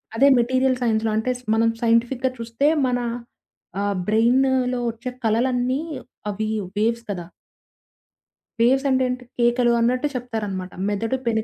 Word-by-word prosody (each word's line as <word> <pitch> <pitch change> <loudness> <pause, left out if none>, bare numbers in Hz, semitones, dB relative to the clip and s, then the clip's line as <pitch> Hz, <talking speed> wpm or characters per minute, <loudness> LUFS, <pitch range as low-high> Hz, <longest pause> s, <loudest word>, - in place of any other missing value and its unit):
అదే 270 +5 +5
మెటీరియల్ 255 +2 +2
సైన్స్‌లో 220 -2 +1
అంటే 235 +4 0
స్ - - -20
మనం 230 0 +3
సైంటిఫిక్‌గా 240 +3 +2
చూస్తే 230 +5 0 0.2
మన 245 0 0 0.8
ఆహ్, 200 -1 0
బ్రెయినులో 250 +3 +2
ఒచ్చే 235 +3 -7
కలలన్నీ 245 +3 +1 0.5
అవి 215 +2 -3 0.3
వేవ్స్ 230 +2 +1
కదా! 175 -3 -5 1.4
వేవ్స్ 265 +4 +3
అంటేంటి 255 -1 0 0.2
కేకలు 240 0 +3
అన్నట్టు 250 +5 +1
చెప్తారనమాట. 210 -7 -4 0.2
మెదడు 225 +5 -1
పెను 220 -1 +1
240 Hz, 120 wpm, -22 LUFS, 225-255 Hz, 1.4 s, అదే